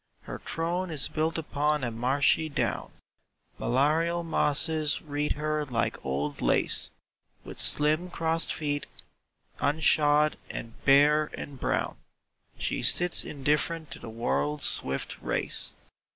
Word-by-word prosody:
Her - - -8
throne 175 +3 -2
is 155 -4 +4
built 160 +2 -2
upon 150 -2 -1
a 120 - -2
marshy 135 +7 +1
down; 140 - -2 0.7
Malarial 160 +6 +1
mosses 155 -1 +1
wreathe 150 -1 -2
her 155 0 -2
like 120 -5 -3
old 70 +2 -3
lace; - - +1 0.5
With - - -9
slim 155 +4 +3
crossed 165 -1 0
feet, 145 -2 -3 0.7
unshod 150 0 +3
and 115 - -7
bare 150 +2 +4
and 140 -2 -8
brown. - - -2 0.6
She - - -2
sits 175 0 +5
indifferent 150 +2 -2
to - - -6
the - - -9
world's 140 +6 -1
swift 65 0 -1
race. - - 0
150 Hz, 120 wpm, -27 LUFS, 140-160 Hz, 0.7 s, sits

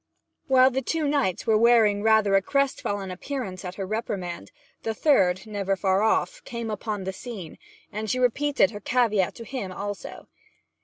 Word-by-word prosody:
While 260 0 +5
the 265 +1 -1
two 310 +3 -1
knights 280 -11 0
were 220 -1 +3
wearing 225 -3 +4
rather 220 -2 +4
a 195 - +5
crest 275 +6 0
fallen 200 -2 -3
appearance 190 -2 -5
at 180 0 -6
her 195 - -4
reprimand, 190 -4 -4 0.3
the 225 -1 -3
third, 190 - +3
never 200 -2 -1
far 190 0 +1
off, - - +1
came 235 -3 -5
upon 210 -1 -4
the 190 +1 -4
scene, 195 -7 -8 0.3
and 215 +1 -4
she 255 - 0
repeated 255 -2 +2
her 205 - -7
caveat 215 -4 +1
to 230 - -8
him 220 -7 -5
also. 205 +2 -6
215 Hz, 170 wpm, -25 LUFS, 195-250 Hz, 0.3 s, While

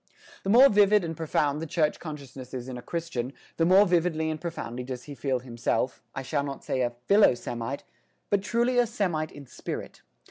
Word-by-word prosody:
The 195 - -4
more 250 +6 +9
vivid 205 -2 +5
and 165 -1 -3
profound 150 -2 0
the 165 - -4
church 155 -1 +1
consciousness 135 -5 -8
is 125 0 -5
in 130 - -5
a 125 - -6
Christian, 140 -6 -4 0.2
the 165 - +3
more 190 +3 +7
vividly 165 -3 +1
and 155 0 -5
profoundly 125 -8 -5
does 125 -1 -6
he 145 - -8
feel 135 -2 -1
himself, 120 0 -1
I 135 - -3
shall 140 +2 -1
not 140 -1 -6
say 130 - -1
a 120 -1 0
philo 200 -10 +6
Semite, 120 +3 -5 0.5
but 200 -1 +3
truly 240 +4 +1
a 240 - +4
Semite 180 -9 -1
in 145 -1 -11
spirit. 125 - -7
155 Hz, 200 wpm, -27 LUFS, 130-180 Hz, 0.5 s, more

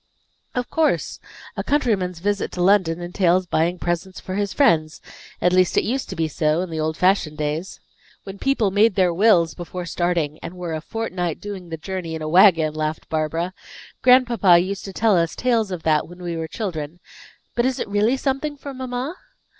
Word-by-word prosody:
"Of 250 -1 -1
course. 320 -1 0 0.4
A - - -3
countryman's 210 - 0
visit 205 +3 -1
to 180 - -1
London 180 -3 +3
entails 180 +1 +1
buying 175 +1 0
presents 175 +2 -3
for 185 - -7
his 200 0 -1
friends; 155 - +2 0.4
at 180 - +2
least, 185 -1 +3
it - - +4
used 260 +4 -2
to - - -5
be 160 -1 0
so, 155 +2 0
in 185 -2 -5
the 160 - -3
old 155 +1 -1
fashioned 180 -5 +2
days." 155 +4 -3 0.4
"When 195 0 -9
people 255 -7 +1
made 205 +1 +3
their 185 -3 +3
wills 175 -4 +4
before 175 0 -6
starting, 170 -3 -1
and 180 - -7
were 175 -2 -4
a 155 - -3
fortnight 180 -4 -3
doing 195 -4 -7
the 165 - -5
journey 170 -1 -5
in 160 - -5
a - - -3
wagon," 165 -2 +5
laughed 155 0 -3
Barbara. 160 +3 -1 0.5
"Grandpapa 240 -8 +5
used 190 +3 -2
to 195 - -7
tell 220 -1 +3
us 165 -2 +1
tales 230 -4 +1
of 180 -3 -5
that, 155 -1 +2
when 175 +1 -12
we 170 -1 -3
were 160 0 -3
children. 165 -4 -5 0.5
But 240 +1 +1
is 260 - -1
it - - -3
really 210 +5 +2
something 280 +2 -2
for 280 0 -8
mamma?" 255 +4 -4
180 Hz, 195 wpm, -22 LUFS, 165-210 Hz, 0.5 s, wagon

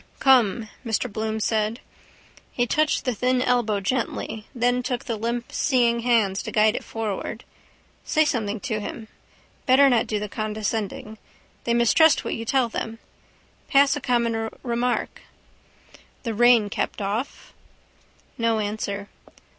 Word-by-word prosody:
—Come, 235 -5 +4 0.2
Mr 225 -1 -2
Bloom 220 0 -2
said. 220 +1 0 0.7
He 245 - 0
touched 305 +5 +1
the 250 - +1
thin 250 +3 +1
elbow 240 -5 +1
gently: 220 0 -3
then 245 +1 +1
took 250 -1 -3
the 230 - -2
limp 235 +2 -3
seeing 240 -4 +2
hand 225 -5 +2
to - - -4
guide 215 0 +3
it - - -4
forward. 220 -3 -4 0.6
Say 310 0 +2
something 220 -6 -1
to 220 -5 -2
him. 220 +1 -7 0.6
Better 275 +2 +6
not 235 -2 +2
do 215 - -1
the 210 - -4
condescending. 215 0 -4 0.5
They 235 - +1
mistrust 265 +7 +4
what - - -2
you 230 - -4
tell 260 0 +2
them. 225 0 -5 0.7
Pass 275 0 +4
a 290 - -5
common 235 -3 0
remark. 240 0 -1 1.0
—The 230 -3 -2
rain 235 -2 +4
kept - - -2
off. 215 +7 -4 0.9
No 230 -1 +2
answer. 205 -1 -3
230 Hz, 140 wpm, -24 LUFS, 215-245 Hz, 1.0 s, Better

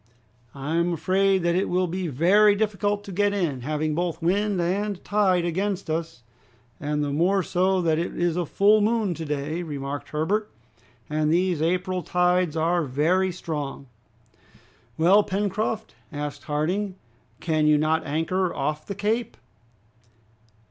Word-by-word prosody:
I 145 +4 -2
am 170 +1 +1
afraid 190 +3 +2
that 170 0 +2
it 185 +3 0
will 185 +1 +1
be 180 +1 -3
very 195 +9 +4
difficult 205 -1 -1
to 200 - -9
get 205 +2 +1
in, 155 -10 -1
having 155 +3 -1
both 170 0 -2
wind 195 +3 +1
and 195 +3 -1
tide 190 -4 +2
against 190 0 -2
us." 160 -7 -4 0.6
"And 150 0 -1
the 145 - -2
more 180 +6 +2
so 185 +1 +1
that 160 -1 +2
it 170 - -3
is 175 -1 +1
a 175 -2 -1
full 210 +5 +4
moon 215 -3 +1
to 165 -1 -6
day," 150 +3 -3
remarked 145 -3 -5
Herbert, 200 +8 -1 0.6
"and 155 0 0
these 175 -1 +1
April 180 +2 0
tides 180 -2 +1
are 170 +2 +2
very 165 +8 +1
strong." 150 -6 -5 1.1
"Well, 185 +6 +5
Pencroft," 210 +2 -2 0.2
asked 145 -1 -5
Harding, 180 +7 -1 0.4
"can 155 -2 +1
you 150 0 +5
not 155 +1 +1
anchor 165 +5 -1
off 150 +2 -3
the 200 - -4
Cape?" 220 +3 -1
175 Hz, 150 wpm, -25 LUFS, 155-195 Hz, 1.1 s, Well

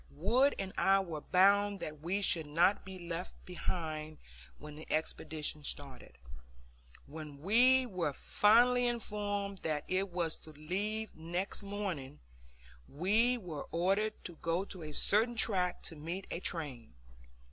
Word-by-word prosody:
Wood 250 - +3
and 190 -1 -4
I 195 0 +5
were 170 -6 -4
bound 200 +3 +4
that 155 -1 -5
we 190 +5 -1
should 165 -4 +2
not 175 +7 +3
be 190 -1 -8
left 170 0 -5
behind 155 -3 -4 0.4
when 150 0 -10
the 155 - -10
expedition 155 -1 -2
started. 140 -3 -6 0.9
When 150 -1 -9
we 250 - +5
were 180 -9 -1
finally 245 - +4
informed 205 -4 -2
that 155 -3 -2
it 190 +1 0
was 170 -3 -1
to 155 - -13
leave 205 +8 -3
next 175 +6 -2
morning, 195 - -4 0.7
we 215 - +2
were 170 -9 -6
ordered 195 +6 +1
to 175 -4 -7
go 170 +5 -1
to 185 -3 -8
a 155 -1 -6
certain 220 +10 +3
track 185 -6 +1
to 165 - -4
meet 170 +6 -5
a - - -2
train. 140 - -5
180 Hz, 140 wpm, -33 LUFS, 155-205 Hz, 0.9 s, I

